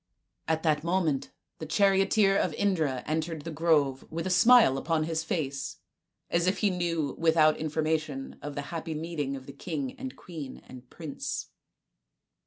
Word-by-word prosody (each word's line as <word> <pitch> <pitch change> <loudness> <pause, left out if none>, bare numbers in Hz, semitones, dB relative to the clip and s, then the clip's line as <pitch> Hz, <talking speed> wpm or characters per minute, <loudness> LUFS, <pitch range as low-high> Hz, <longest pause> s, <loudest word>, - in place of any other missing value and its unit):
At 160 0 0
that 155 -2 +2
moment 170 -5 0 0.3
the 155 - -6
charioteer 195 +3 +4
of - - +1
Indra 160 -10 0
entered 160 0 -2
the 165 - -5
grove 150 -4 +2
with 165 +2 -3
a 185 - -1
smile 220 - +6
upon 160 +1 0
his 160 0 -1
face, 140 -5 -3 0.5
as 170 +1 +2
if 185 - +2
he 205 -2 +2
knew 165 -5 -1
without 160 -2 +4
information 155 -2 -2
of 145 -1 -6
the 145 - -3
happy 165 -1 -4
meeting 150 -3 -3
of 135 -1 -10
king 150 -7 -3
and 265 0 -6
queen 155 -7 -8
and 125 -1 -12
prince. 155 -4 -5
160 Hz, 155 wpm, -28 LUFS, 145-175 Hz, 0.5 s, smile